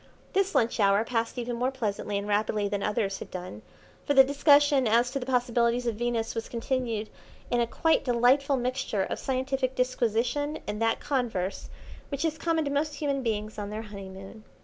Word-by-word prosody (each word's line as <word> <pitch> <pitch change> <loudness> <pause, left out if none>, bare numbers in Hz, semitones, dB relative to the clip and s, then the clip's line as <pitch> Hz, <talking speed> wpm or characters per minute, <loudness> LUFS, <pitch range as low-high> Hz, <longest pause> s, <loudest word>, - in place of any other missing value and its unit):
This 390 +1 +1
lunch 230 0 +2
hour 200 +1 +4
passed 230 0 -2
even 240 0 -3
more 250 +2 +1
pleasantly 210 -5 -2
and 200 +1 -4
rapidly 210 0 +1
than 200 0 -2
others 205 -2 -1
had - - -8
done, 180 - -7 0.4
for 285 - 0
the 270 - +10
discussion 285 -1 +4
as 235 +3 +3
to 275 - -2
the 250 - -7
possibilities 245 -1 +1
of 235 - 0
Venus 230 0 -1
was 225 -1 -4
continued 235 -3 -2 0.4
in 240 -1 +3
a 235 - +1
quite 325 +7 +2
delightful 260 +3 +3
mixture 250 -5 -1
of - - -4
scientific 260 0 -1
disquisition 250 +4 0
and 210 +1 -4
that 225 0 +1
converse 225 -9 -2 0.4
which 280 +2 -2
is 315 -1 -1
common 325 -2 +1
to 280 - -2
most 290 +1 0
human 280 -2 -1
beings 215 -3 -3
on 205 -1 -4
their 215 +1 -5
honeymoon. 195 0 -10
240 Hz, 185 wpm, -28 LUFS, 215-270 Hz, 0.4 s, the